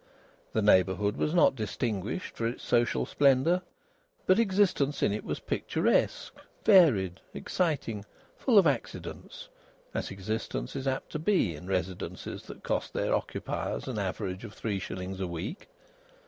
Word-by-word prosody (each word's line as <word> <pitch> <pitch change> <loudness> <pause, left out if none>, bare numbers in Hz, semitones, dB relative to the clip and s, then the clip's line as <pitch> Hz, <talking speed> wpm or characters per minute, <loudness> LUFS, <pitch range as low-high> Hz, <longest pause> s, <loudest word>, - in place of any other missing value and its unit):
The 110 - +1
neighbourhood 100 0 +4
was 150 - 0
not 170 - +6
distinguished 110 - -3
for 115 - -1
its 120 - -5
social 120 0 +2
splendour, 140 +6 +3 0.6
but 185 +3 +5
existence 190 -9 +2
in 100 - +3
it 105 - -3
was - - -3
picturesque, - - 0 0.3
varied, 125 - +5 0.2
exciting, 140 - -1 0.3
full 245 -5 +3
of 195 - +8
accidents, 140 -6 -3 0.5
as - - -2
existence 100 - -4
is 135 0 -3
apt 135 0 -2
to 155 - -3
be 160 - +2
in 75 +5 -10
residences 95 -1 -3
that - - -10
cost - - -2
their - - 0
occupiers - - -2
an - - -2
average 95 0 -3
of 100 - -9
three 100 -3 -2
shillings 95 0 -5
a 95 - -1
week. 90 - -5
115 Hz, 145 wpm, -29 LUFS, 95-155 Hz, 0.6 s, of